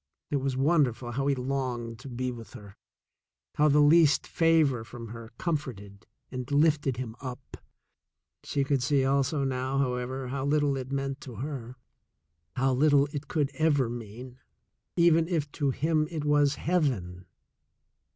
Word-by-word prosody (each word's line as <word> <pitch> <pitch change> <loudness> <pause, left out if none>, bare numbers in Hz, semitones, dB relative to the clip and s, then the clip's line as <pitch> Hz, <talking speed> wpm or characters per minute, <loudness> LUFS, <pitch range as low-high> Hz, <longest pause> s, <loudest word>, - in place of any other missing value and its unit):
It 145 - +2
was 135 -1 -2
wonderful 130 -5 +2
how 135 +3 -1
he 140 - +2
longed 125 -3 -3
to 135 - -9
be 125 +1 -3
with 115 -2 -10
her, 100 -2 -12 0.8
how 150 - +3
the 150 0 +5
least 155 0 +5
favor 160 -8 +2
from 115 0 -9
her 115 0 -9
comforted 120 - -4 0.2
and 125 0 -5
lifted 145 -3 +2
him 120 -3 -5
up. 130 -2 -8 0.9
She 140 - -1
could 135 -1 0
see 135 0 +2
also 140 +2 +1
now, 130 0 -1
however, 130 0 -2
how 135 0 -3
little 145 0 +2
it 130 0 -5
meant 135 0 -3
to 125 -4 -9
her, 125 0 -6 0.8
how 130 +1 +2
little 140 +1 +4
it 145 0 -5
could 150 -2 0
ever 145 -6 +2
mean, 120 +2 -8 0.6
even 165 -1 +4
if 155 -5 -1
to 145 -2 -1
him 155 +3 +1
it 155 -3 -4
was 145 -1 +3
heaven. 115 - -1
135 Hz, 150 wpm, -28 LUFS, 125-145 Hz, 0.9 s, the